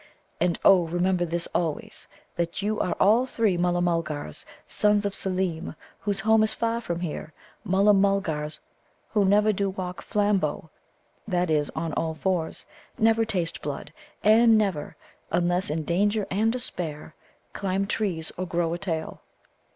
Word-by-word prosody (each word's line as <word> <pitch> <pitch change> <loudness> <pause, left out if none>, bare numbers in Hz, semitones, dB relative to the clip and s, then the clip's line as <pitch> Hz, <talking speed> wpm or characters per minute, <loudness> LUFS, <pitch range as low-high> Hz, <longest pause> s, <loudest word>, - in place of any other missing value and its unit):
"And 175 0 +1
oh, 180 -3 +6
remember 175 +1 +1
this 170 0 -1
always: 165 -4 -2 0.3
that 170 +3 -2
you 215 +1 0
are 180 - 0
all 225 +6 +4
three 225 -7 +1
Mulla 175 0 +1
mulgars, 155 - -2 0.2
sons 210 -1 +2
of 200 - -1
Seelem, 185 -5 -2 0.2
whose 205 -1 -1
home 220 0 +4
is 215 - +1
far 230 0 -1
from 170 -5 -3
here 155 -2 -5 0.3
Mulla 200 +1 +4
mulgars 190 -7 0 0.5
who 210 -2 +3
never 210 +2 +4
do 200 0 0
walk 185 -1 -5
flambo 195 -7 0 0.6
that 180 -4 0
is, 150 -2 +1
on 160 -1 -2
all 160 +1 -1
fours 170 0 -2 0.3
never 225 +1 +4
taste 185 -7 -2
blood, 145 -2 -5 0.3
and 225 +1 +6
never, 195 -8 -1 0.3
unless 175 +2 +1
in 155 +1 -1
danger 205 +5 +1
and 215 +4 +2
despair, 170 -12 -4 0.4
climb 195 0 -1
trees 185 -6 -2
or 185 +1 -3
grow 170 -1 0
a 175 - -4
tail." 165 -5 -4
185 Hz, 150 wpm, -26 LUFS, 165-205 Hz, 0.6 s, oh